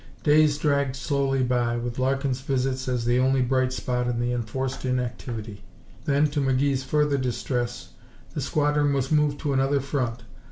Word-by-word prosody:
Days 150 -1 +4
dragged 140 -3 +1
slowly 135 -1 0
by, 120 -1 +1
with 120 +1 -4
Larkin's 135 0 0
visits 130 -1 -1
as 125 -2 -1
the 120 +1 +3
only 130 0 +3
bright 130 0 +1
spot 125 -1 -2
in 120 -1 -1
the 120 +1 0
enforced 125 +3 -3
inactivity. 120 -4 -3 0.4
Then, 145 +1 +3
to 145 -1 0
McGee's 135 0 +1
further 150 0 +1
distress, 120 -1 -2 0.4
the 150 - -3
squadron 145 +1 +1
was 135 0 -1
moved 150 -1 +2
to 145 -3 -1
another 135 +1 +2
front. 125 -4 -2
130 Hz, 160 wpm, -25 LUFS, 125-140 Hz, 0.4 s, Days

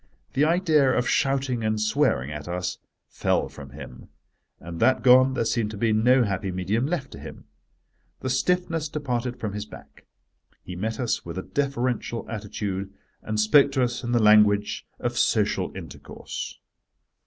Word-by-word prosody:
The 145 - +3
idea 160 -4 +3
of 125 - 0
shouting 135 -3 0
and 110 0 0
swearing 110 - +1
at 75 +1 -7
us 90 +1 -3 0.3
fell - - 0
from 70 -2 -11
him: 65 -2 -11 0.5
and 85 0 -8
that 130 +3 +3
gone 130 +1 +6
there 115 - 0
seemed 115 -1 0
to 105 - -7
be 110 +1 +1
no 125 +4 +4
happy 100 -2 -2
medium 100 +8 -1
left 150 -5 -3
to - - -10
him. - - -10 0.8
The 130 - -3
stiffness 165 +2 0
departed 125 -5 -3
from 105 -3 -4
his 105 0 -5
back. - - -15 0.6
He 90 - -8
met 110 +6 -3
us 120 -3 -1
with 85 +1 -7
a 95 - -3
defferential 125 -4 -2
attitude, 100 -3 -4 0.3
and 110 0 -3
spoke 140 +6 +5
to 130 -2 +2
us 120 0 -2
in 120 - -3
the 120 - +3
language 105 -1 +4
of - - -2
social - - +1
intercourse. - - -8
115 Hz, 165 wpm, -25 LUFS, 105-130 Hz, 0.8 s, gone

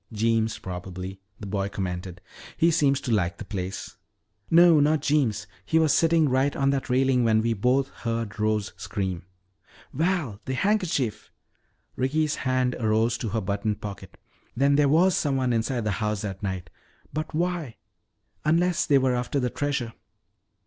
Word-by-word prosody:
"Jeems, 110 0 +1
probably," 95 +1 -7 0.2
the 105 - -7
boy 100 0 -2
commented. 90 -2 -5 0.4
"He 165 +1 +4
seems 140 -4 +2
to 125 - -3
like 95 -5 +1
the - - -8
place." 95 -2 -5 0.5
"No, 170 -1 +7
not 150 0 +2
Jeems. 125 -9 +1 0.2
He 160 - +1
was 160 -2 +4
sitting 165 -1 +3
right 135 +2 +1
on 135 0 +2
that 135 -2 -2
railing 130 0 +3
when 110 -1 +3
we 115 0 +1
both 125 +6 +1
heard 115 -2 -4
Rose 105 -1 0
scream." 95 -4 -4 0.7
"Val, 155 - -1
the 130 - -2
handkerchief!" 180 - 0 0.7
Ricky's 150 +3 0
hand 130 -1 0
arose 110 +1 +2
to 115 - -3
her 110 +2 -1
buttoned 100 +2 -2
pocket. 100 -2 -8 0.4
"Then 140 +2 +4
there 145 -1 +4
was 175 +5 +4
someone 135 -4 +1
inside 115 +2 0
the 105 - 0
house 105 -1 -1
that 95 -2 -5
night. 95 -4 -4 0.4
But 155 0 -4
why 170 -7 -2 0.7
unless 170 +3 +2
they 140 - +5
were 130 -1 +2
after 125 +3 -1
the 125 -2 -1
treasure!" 140 -5 -2
125 Hz, 155 wpm, -26 LUFS, 105-145 Hz, 0.7 s, No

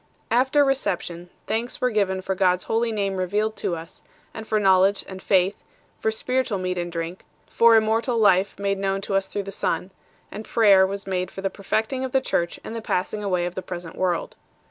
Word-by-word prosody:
After 265 +5 +4
reception, 180 -10 -2 0.2
thanks 230 +2 -2
were 250 0 +1
given 190 -3 0
for 190 - -1
God 185 -1 +3
s 180 - -10
Holy 230 +1 0
Name 200 -3 -1
revealed 210 +4 0
to 175 - -1
us, 165 +1 -10 0.3
and 220 -1 -8
for 215 - +1
knowledge 195 0 +4
and 190 -1 -8
faith, 190 0 +2 0.4
for 220 - +1
spiritual 250 0 -1
meat 185 -1 -2
and 175 0 -3
drink; 170 +2 -5 0.2
for 230 0 +5
immortal 225 +2 +2
life 195 -3 +3
made 200 0 -1
known 195 0 -1
to 195 - -4
us 195 0 +1
through 205 - -4
the 195 - -7
Son; 185 -1 -2 0.4
and 215 - -6
prayer 200 -5 +5
was 200 +1 -5
made 185 -1 -2
for 195 - -8
the 195 0 -1
perfecting 220 +7 -2
of 260 - -4
the 265 - +5
Church 170 -7 -1
and 225 - -7
the 230 - -4
passing 210 +1 -2
aw 200 - -2
r 180 -1 +2
ay - - 0
of 175 - -4
the 185 - -4
present 175 -3 -7
world. 180 -2 -1
195 Hz, 215 wpm, -24 LUFS, 185-220 Hz, 0.4 s, for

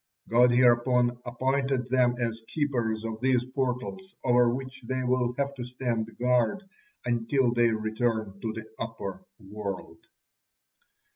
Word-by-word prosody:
God 120 +2 +5
hereupon 120 0 +4
appointed 130 +1 0
them 125 -1 +3
as 115 -2 -2
keepers 120 -8 -1
of 110 0 -5
these 125 -2 +2
portals 130 +9 -3
over 125 -1 +4
which 130 +1 -5
they 130 0 -1
will 125 -1 +1
have 140 0 0
to 130 -3 -6
stand 120 -3 -3
guard 125 - +2 0.4
until 120 +1 +1
they 120 -1 +4
return 110 -2 -1
to 110 - -2
the 110 0 -7
upper 100 -5 -5 0.2
world. 100 -4 -7
120 Hz, 130 wpm, -28 LUFS, 115-130 Hz, 0.4 s, God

